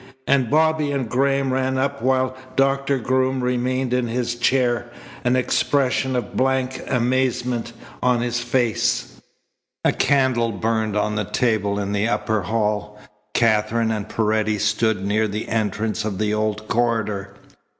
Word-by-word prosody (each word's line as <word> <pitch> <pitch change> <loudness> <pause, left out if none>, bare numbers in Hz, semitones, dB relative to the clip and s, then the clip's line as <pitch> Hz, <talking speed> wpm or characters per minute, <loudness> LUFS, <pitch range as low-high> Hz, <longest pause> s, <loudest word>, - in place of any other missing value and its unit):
And 130 -4 +2
Bobby 155 -1 +2
and 135 -4 -1
Graham 135 +2 +1
ran 130 0 0
up 140 +1 -1
while 130 +1 +1 0.2
Doctor 135 0 +2
Groom 130 +1 0
remained 125 +1 0
in 125 -1 +1
his 120 +1 -1
chair, 120 -1 +1 0.3
an 125 +1 +2
expression 130 0 +1
of 125 - -3
blank 130 0 0
amazement 125 -1 0 0.3
on 125 -2 +2
his 120 0 -1
face. 120 - 0 0.6
A - - +5
candle 130 -5 +2
burned 110 +1 -1
on 105 0 0
the 105 -1 -1
table 110 -4 0
in 100 -1 -2
the 105 +1 +1
upper 110 -2 0
hall. 105 0 -2 0.4
Katherine 110 0 +2
and 110 -1 -3
Paredes 110 -1 0
stood 110 -2 +1
near 110 +2 +1
the 105 +1 -4
entrance 110 0 -1
of 105 -3 -3
the 105 +1 0
old 105 0 -1
corridor. 105 -4 -1
120 Hz, 140 wpm, -22 LUFS, 110-130 Hz, 0.6 s, A